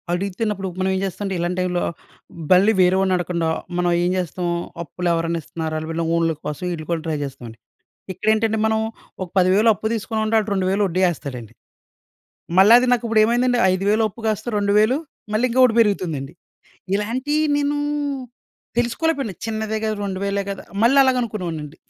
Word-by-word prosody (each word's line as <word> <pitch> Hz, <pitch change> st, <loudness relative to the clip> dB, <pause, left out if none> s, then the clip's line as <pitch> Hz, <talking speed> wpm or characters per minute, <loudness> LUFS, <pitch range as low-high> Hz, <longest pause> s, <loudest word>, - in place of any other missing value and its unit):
అడిగితిన్నప్పుడు 195 Hz, +2 st, -2 dB
మనం 190 Hz, 0 st, +1 dB
ఏం -, -, -1 dB
జేస్తామంటే 195 Hz, 0 st, -4 dB
ఇలాంటి 175 Hz, +1 st, -2 dB
టైమ్‌లో, 180 Hz, -1 st, 0 dB, 0.7 s
బల్లి 190 Hz, +4 st, +6 dB
వేరే 180 Hz, +1 st, +4 dB
వాడిని 190 Hz, -1 st, +2 dB
అడగకుండా, 170 Hz, -2 st, -1 dB, 0.3 s
మనం 175 Hz, 0 st, +1 dB
ఏం 175 Hz, -, +1 dB
జేస్తాం. 180 Hz, 0 st, -3 dB, 0.4 s
అప్పులేవరైనా 170 Hz, +1 st, -1 dB
ఇస్తున్నారా, 160 Hz, +1 st, -4 dB
వీళ్ళ 165 Hz, +1 st, -2 dB
ఓన్లు 165 Hz, -1 st, +1 dB
కోసం 150 Hz, +3 st, -5 dB
వీళ్ళు 160 Hz, -3 st, -5 dB
కూడా 165 Hz, -1 st, 0 dB
ట్రై 155 Hz, -2 st, -1 dB
చేస్తామండి. 125 Hz, -5 st, -8 dB, 0.6 s
ఇక్కడెంటంటే 220 Hz, +3 st, +1 dB
మనం, 220 Hz, 0 st, +1 dB, 0.4 s
ఒక 185 Hz, -, -5 dB
10000 190 Hz, +5 st, +4 dB
అప్పు 220 Hz, -, -6 dB
తీసుకొనుంటే, 220 Hz, 0 st, -2 dB
వాడు 215 Hz, 0 st, -2 dB
2000 190 Hz, +1 st, +1 dB
వడ్డీ 185 Hz, +1 st, -1 dB
ఏస్తాడండి. 125 Hz, -8 st, -7 dB, 1.1 s
మళ్ళా 200 Hz, +4 st, +8 dB
అది 255 Hz, -, 0 dB
నాకు 240 Hz, -, 0 dB
ఇప్పుడు 220 Hz, -1 st, +4 dB
ఏమైందండి, 245 Hz, +2 st, +2 dB
5000 205 Hz, +4 st, +1 dB
అప్పు 215 Hz, -, -16 dB
కాస్త 215 Hz, -1 st, -1 dB
2000 210 Hz, +5 st, +3 dB, 0.4 s
మళ్ళీ 220 Hz, +4 st, +2 dB
ఇంకొకటి 250 Hz, -1 st, +4 dB
పెరుగుతుందండి. 170 Hz, -10 st, 0 dB, 0.6 s
ఇలాంటియి 255 Hz, +9 st, 0 dB
నేను, 290 Hz, 0 st, 0 dB, 1.0 s
తెలుసుకోలేకపోయాను. 245 Hz, -, 0 dB
చిన్నదే 220 Hz, -1 st, -2 dB
గదా! 215 Hz, 0 st, 0 dB
రెండు 190 Hz, -2 st, -3 dB
వేలే 200 Hz, 0 st, -1 dB
గదా 195 Hz, -, -6 dB, 0.2 s
మళ్ళలాగనుకునేవాడనండీ. 225 Hz, -, +1 dB
195 Hz, 145 wpm, -21 LUFS, 175-220 Hz, 1.1 s, మళ్ళా